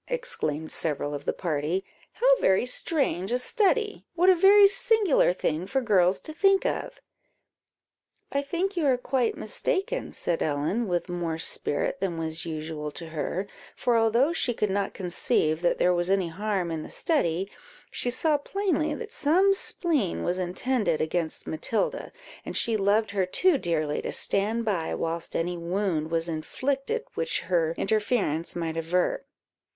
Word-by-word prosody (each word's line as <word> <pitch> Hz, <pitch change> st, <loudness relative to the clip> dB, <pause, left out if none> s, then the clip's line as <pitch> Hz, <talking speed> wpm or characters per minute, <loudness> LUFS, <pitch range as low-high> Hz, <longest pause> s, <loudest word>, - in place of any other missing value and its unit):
exclaimed 160 Hz, -, -3 dB
several 145 Hz, -2 st, -2 dB
of 145 Hz, -, -6 dB
the -, -, +1 dB
party; 165 Hz, +2 st, -2 dB, 0.3 s
"how -, -, -3 dB
very 190 Hz, -, +3 dB
strange 250 Hz, -, -1 dB
a 245 Hz, -, +2 dB
study! 415 Hz, -, +1 dB
what 360 Hz, +2 st, +5 dB
a -, -, +5 dB
very 400 Hz, +3 st, +7 dB
singular 400 Hz, -, +3 dB
thing 175 Hz, -1 st, -2 dB
for 265 Hz, +6 st, 0 dB
girls 190 Hz, -6 st, +3 dB
to 310 Hz, -, -9 dB
think 390 Hz, +4 st, +3 dB
of!" -, -, -3 dB, 1.3 s
"I 280 Hz, -, +1 dB
think 350 Hz, +7 st, -2 dB
you 325 Hz, -5 st, +1 dB
are 260 Hz, -2 st, +3 dB
quite 250 Hz, -1 st, 0 dB
mistaken," 390 Hz, -, -2 dB
said 170 Hz, -2 st, -2 dB
Ellen, 155 Hz, +10 st, 0 dB
with 175 Hz, 0 st, -1 dB
more 175 Hz, -2 st, -3 dB
spirit 160 Hz, +2 st, -1 dB
than 185 Hz, -3 st, -2 dB
was 160 Hz, +1 st, -2 dB
usual 155 Hz, -1 st, -4 dB
to 165 Hz, +2 st, -8 dB
her; 165 Hz, +5 st, -3 dB, 0.3 s
for, 245 Hz, -, +1 dB
although 230 Hz, +7 st, +3 dB
she 245 Hz, -7 st, 0 dB
could 210 Hz, -3 st, 0 dB
not 200 Hz, 0 st, -1 dB
conceive 170 Hz, -3 st, 0 dB
that 175 Hz, -, +2 dB
there 180 Hz, -, +3 dB
was 175 Hz, +1 st, 0 dB
any 190 Hz, -3 st, +1 dB
harm 195 Hz, -1 st, -2 dB
in 160 Hz, -1 st, -3 dB
the -, -, -9 dB
study, 195 Hz, -, 0 dB, 0.4 s
she 245 Hz, -, 0 dB
saw 295 Hz, +4 st, +1 dB
plainly 355 Hz, -1 st, -1 dB
that 450 Hz, -2 st, -7 dB
some 375 Hz, +3 st, +3 dB
spleen 310 Hz, -, -1 dB
was 180 Hz, +1 st, -1 dB
intended 185 Hz, 0 st, 0 dB
against 160 Hz, 0 st, -2 dB
Matilda, 230 Hz, -, -2 dB, 0.3 s
and -, -, -3 dB
she 230 Hz, -, +3 dB
loved 205 Hz, +1 st, +2 dB
her 195 Hz, -2 st, 0 dB
too 345 Hz, -, +3 dB
dearly, 155 Hz, -5 st, -1 dB
to -, -, -4 dB
stand 220 Hz, +4 st, +1 dB
by 185 Hz, -7 st, -1 dB
whilst 165 Hz, 0 st, -4 dB
any 175 Hz, +1 st, -1 dB
wound 170 Hz, -2 st, -1 dB
was 165 Hz, 0 st, 0 dB
inflicted 270 Hz, -, -2 dB
which 480 Hz, -, -1 dB
her 165 Hz, -3 st, 0 dB
interference 205 Hz, -6 st, 0 dB
might 165 Hz, -1 st, -3 dB
avert. 180 Hz, +10 st, 0 dB
195 Hz, 160 wpm, -26 LUFS, 165-280 Hz, 1.3 s, very